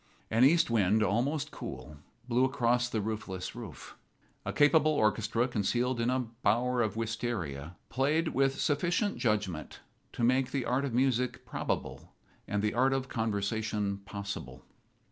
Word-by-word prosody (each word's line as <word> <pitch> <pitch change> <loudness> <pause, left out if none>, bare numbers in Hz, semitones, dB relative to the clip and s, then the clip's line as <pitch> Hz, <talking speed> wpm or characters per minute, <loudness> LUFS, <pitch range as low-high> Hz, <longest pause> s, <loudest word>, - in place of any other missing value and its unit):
An 115 +3 +4
east 155 -1 +5
wind, 110 -1 +3
almost 125 - 0
cool, 75 - -8 0.3
blew 125 +1 +2
across 125 -2 +2
the 110 -3 -1
roofless 100 -4 -4
roof. - - -9 0.5
A - - -1
capable 155 +1 +4
orchestra 110 -1 +1
concealed 120 +2 0
in 115 - +1
a 130 0 +1 0.2
bower 125 +3 +2
of 110 -3 0
wistaria 110 - -3
played 150 +6 +1
with 135 0 +1
sufficient 175 +7 +1
judgment 105 - -1 0.3
to - - -3
make 130 +2 +3
the 135 -3 -2
art 130 +3 +1
of 135 - -3
music 125 -1 +1
probable - - -4 0.3
and 105 0 -1
the 105 - +1
art 130 +3 +3
of 135 0 -2
conversation 105 -2 -1
possible. 100 0 -7
120 Hz, 145 wpm, -30 LUFS, 105-130 Hz, 0.5 s, east